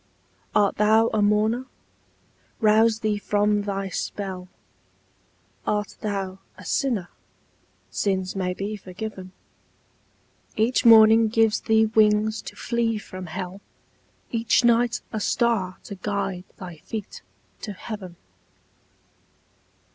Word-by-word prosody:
Art 205 -1 +3
thou 220 +2 +4
a 215 - +2
mourner? 215 +5 +2 0.9
Rouse 220 +1 +4
thee 210 -1 0
from 205 0 +1
thy 195 -1 -3
spell; 185 -1 -4 1.2
Art 210 -1 -1
thou 195 -2 -3 0.2
a - - -12
sinner? 230 -10 -1 0.8
Sins 190 -2 -1
may 180 -1 -1
be 205 +3 -4
forgiven; 190 -1 -8 1.2
Each 230 +3 +2
morning 225 0 +8
gives 225 0 +2
thee 220 0 +3
wings 215 0 +3
to - - -9
flee 235 -2 -1
from 185 -3 -8
hell, 185 +3 -6 0.7
Each 230 +1 +2
night 240 0 +3
a 220 - -2
star 210 -4 0
to - - -8
guide 195 -2 -3
thy 175 -3 -9
feet 210 +6 -7 0.4
to 210 - -5
heaven. 195 -3 -8
210 Hz, 110 wpm, -24 LUFS, 195-220 Hz, 1.2 s, morning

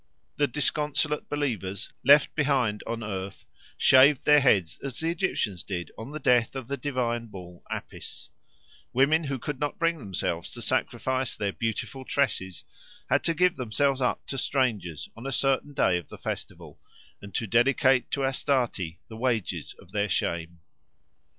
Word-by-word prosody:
The 145 - +3
disconsolate 150 +2 0
believers, 110 - -2 0.2
left 145 +3 +6
behind 135 -8 +1
on 115 0 -3
earth, 100 -2 -5 0.3
shaved 130 +1 +6
their 150 0 +7
heads 95 - +2
as 135 -3 -5
the 165 +1 +1
Egyptians 140 - -1
did 90 -3 -5
on 110 +4 -8
the 155 +1 -6
death 125 -3 +3
of 130 -3 -5
the 140 - -2
divine 125 -4 -2
bull 90 -4 -11
Apis; - - -7 0.6
women 150 +5 +3
who 135 -1 -2
could 130 +3 -5
not 145 -1 -2
bring 165 -1 +1
themselves 90 -6 -3
to - - -7
sacrifice 130 -2 0
their 100 -2 -2
beautiful 115 +3 -3
tresses 100 -10 -1 0.5
had - - +3
to 165 - +1
give 180 +1 +3
themselves 130 +3 +1
up 125 - 0
to 135 - -3
strangers 110 - -1
on 115 +4 -7
a - - -2
certain 135 +2 +1
day 90 -10 +2
of 85 - -14
the - - -9
festival, - - -6 0.4
and 100 0 -10
to 115 - 0
dedicate 125 +3 +3
to 140 -1 0
Astarte 125 - 0
the 110 - -10
wages 115 -5 -1
of 85 - -17
their 105 0 0
shame. 85 -1 -2
125 Hz, 160 wpm, -27 LUFS, 100-140 Hz, 0.6 s, their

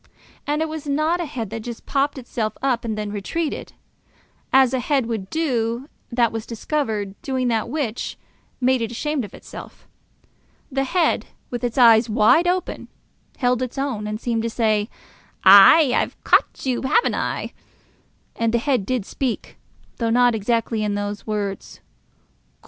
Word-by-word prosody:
And 300 +2 +1
it - - -2
was 310 -1 -6
not 310 +5 +1
a - - -2
head 235 -8 -5
that 225 - -4
just 235 +1 -8
popped 280 +1 0
itself 235 -3 -4
up 255 -4 +1
and 220 -2 -3
then 210 -1 -3
retreated, 290 +11 -3 0.8
as 265 -1 +5
a 260 - +1
head 270 0 +1
would 220 -5 -4
do 255 -4 -1 0.2
that 235 -1 +2
was 225 0 -5
discovered 220 -5 -2
doing 260 -2 -1
that 225 0 0
which 255 -5 -3 0.4
made 255 -1 +2
it 225 - -1
ashamed 285 +4 -2
of 205 - -9
itself. - - -11 0.8
The 270 0 0
head, 340 +5 +1 0.2
with 245 0 -4
its 240 0 -2
eyes 230 -2 +6
wide 220 +11 +4
open, 365 0 -2 0.5
held 250 -1 +1
its 255 +1 -4
own, 255 -7 -2
and 215 0 -4
seemed 230 -2 -1
to 230 - -2
say, 215 -2 +1 0.5
"Ay, 200 +10 +8
I've - - -1
caught - - +2
you, 255 -2 0
have 440 - +2
I?" - - -3 0.8
And 230 0 0
the - - +5
head 245 -5 0
did 250 -6 -1
speak, 255 0 -4 0.4
though 230 -1 0
not 245 +1 +4
exactly 225 0 0
in 205 -1 -1
those 205 +1 -4
words. 205 -2 -4
240 Hz, 160 wpm, -22 LUFS, 220-275 Hz, 0.8 s, Ay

